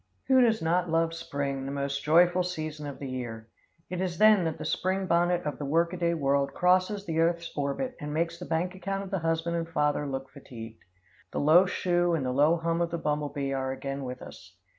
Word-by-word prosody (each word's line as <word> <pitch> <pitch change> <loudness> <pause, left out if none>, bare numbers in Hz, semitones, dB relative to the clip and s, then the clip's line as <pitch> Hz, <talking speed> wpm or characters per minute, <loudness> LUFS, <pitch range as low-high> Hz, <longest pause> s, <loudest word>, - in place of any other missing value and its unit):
Who 260 -1 +6
does 225 -6 +3
not 175 +2 +1
love 165 0 +1
spring, 140 -4 -3
the - - -3
most 140 0 -2
joyful 175 +3 +5
season 155 -4 -4
of 140 - -7
the 140 - -6
year? 120 -3 -6 0.4
It 180 0 -4
is 180 -3 -2
then 215 -3 +6
that 160 -1 -2
the - - -6
spring 190 +1 0
bonnet 175 0 +2
of 150 - -4
the 145 - -3
workaday 170 +3 +1
world 140 -2 +1
crosses 185 +3 +2
the 160 -3 -1
earth's 170 0 +1
orbit 145 - -2
and 150 0 -5
makes 170 +2 -1
the 180 - -6
bank 170 +3 -1
account 195 +1 -3
of 195 - -9
the 195 - 0
husband 165 +1 -1
and 165 0 -3
father 150 -2 0
look 135 0 -4
fatigued. 115 -5 -10 0.5
The - - -3
low 165 +6 +6
shoe 175 -1 +1
and 145 -5 -2
the 125 - 0
low 150 +5 +4
hum 165 +1 -1
of 170 - +1
the 170 - -3
bumble 150 -2 -1
bee 140 -1 -3
are 130 -1 -1
again 135 +1 -5
with 125 -1 -6
us. - - -13
165 Hz, 220 wpm, -28 LUFS, 140-175 Hz, 0.5 s, Who